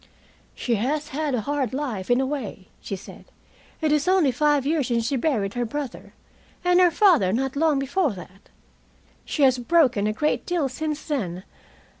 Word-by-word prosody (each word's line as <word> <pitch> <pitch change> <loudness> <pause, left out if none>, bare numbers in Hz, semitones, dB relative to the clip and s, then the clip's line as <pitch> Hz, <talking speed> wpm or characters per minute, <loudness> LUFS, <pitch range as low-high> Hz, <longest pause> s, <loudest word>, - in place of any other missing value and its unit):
"She 235 -3 -1
has 290 +8 -1
had 295 -1 -1
a 235 - -1
hard 275 -1 -2
life, 245 -10 -4
in 245 +1 +4
a 265 - +1
way," 250 -9 -5
she 195 - -4
said. 190 - -12 0.6
"It 310 -1 +1
is 300 +2 +1
only 365 -7 +4
five 290 +1 +2
years 295 -3 +1
since 235 -2 0
she 275 - 0
buried 235 -8 0
her 245 - -1
brother, 280 +3 -6 0.5
and 360 0 +4
her 360 -1 +6
father 335 - +4
not 265 +5 -1
long 305 0 +2
before 280 - 0
that. 185 +1 -13 0.8
She 295 - -1
has 260 -2 +4
broken 245 -7 +3
a - - +1
great 245 -1 0
deal 335 -6 -1
since 305 +3 -4
then. 190 - -3
270 Hz, 180 wpm, -24 LUFS, 235-300 Hz, 0.8 s, her